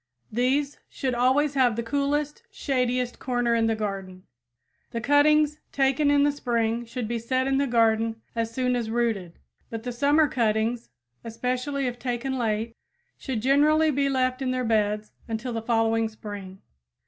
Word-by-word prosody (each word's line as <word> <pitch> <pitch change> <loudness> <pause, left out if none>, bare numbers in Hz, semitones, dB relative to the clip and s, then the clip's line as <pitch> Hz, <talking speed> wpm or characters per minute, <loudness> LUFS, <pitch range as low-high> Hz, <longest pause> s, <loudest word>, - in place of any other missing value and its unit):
These 270 +5 0
should 260 -2 -2
always 260 +4 +2
have 255 -5 +3
the 235 - -2
coolest, 285 +4 -1
shadiest 250 -2 -1
corner 245 -2 0
in 230 -1 +2
the 225 - +1
garden. 195 -3 -5 0.7
The 230 - -4
cuttings 300 +4 +3
taken 275 +1 +2
in 285 0 +4
the 290 - +3
spring 235 -4 -1
should 235 0 -5
be 235 +1 -2
set 255 +3 0
in 270 0 +1
the 280 - +1
garden 225 -1 +2 0.2
as 230 -1 -1
soon 250 +1 0
as 235 -2 -2
rooted; 220 -7 -1 0.3
but 225 -1 -6
the 245 - -3
summer 285 +5 +3
cuttings, 230 -1 0 0.3
especially 250 +4 -2
if 245 -1 -3
taken 255 +1 -2
late, 225 0 -1 0.4
should 240 -6 -4
generally 305 +4 +4
be 280 0 +1
left 255 -1 0
in 260 - -1
their 255 -1 -1
beds 210 -1 0 0.2
until 230 +2 -3
the 225 - -2
following 225 -1 +1
spring. 205 -3 -9
245 Hz, 160 wpm, -26 LUFS, 225-270 Hz, 0.7 s, in